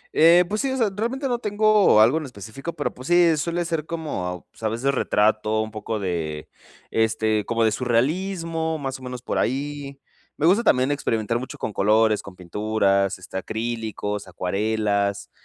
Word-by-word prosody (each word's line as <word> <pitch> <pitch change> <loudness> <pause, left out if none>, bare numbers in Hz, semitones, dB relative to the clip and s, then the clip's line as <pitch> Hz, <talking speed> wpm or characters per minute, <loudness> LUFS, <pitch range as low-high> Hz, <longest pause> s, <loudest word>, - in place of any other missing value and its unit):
Eh, 170 +3 +6
pues, 210 +3 -1
sí, 275 - 0
o 265 - -2
sea, 225 -5 +1
realmente 250 +6 -2
no 245 -2 -1
tengo 210 - +4
algo 120 +9 +5
en 155 - -6
específico, 125 - -7
pero, 150 -3 -3
pues 130 +2 -10
sí, 175 -2 +5
suele 170 +3 -1
ser 165 -2 -2
como, 90 - -4
pues, - - -20
a 110 - 0
veces 130 +5 0
retrato, 110 -2 +1
un 110 0 -4
poco 110 +1 -4
de, 80 -5 -3 0.4
este, 110 -1 +1
como 115 0 0
de 110 - +3
surrealismo, 160 - -1
más 135 -3 -4
o - - -14
menos 125 -1 -7
por - - -1
ahí. 140 +1 -3 0.4
Me 150 - 0
gusta 190 +7 +5
también 130 - +3
experimentar 115 -5 -1
mucho 130 - -7
con 110 - -4
colores, 110 +2 +3
con 100 - -12
pinturas, 100 +1 0
este, 95 +1 -8
acrílicos, 110 -2 -4
acuarelas, 100 +2 -1
120 Hz, 175 wpm, -23 LUFS, 105-160 Hz, 0.4 s, Eh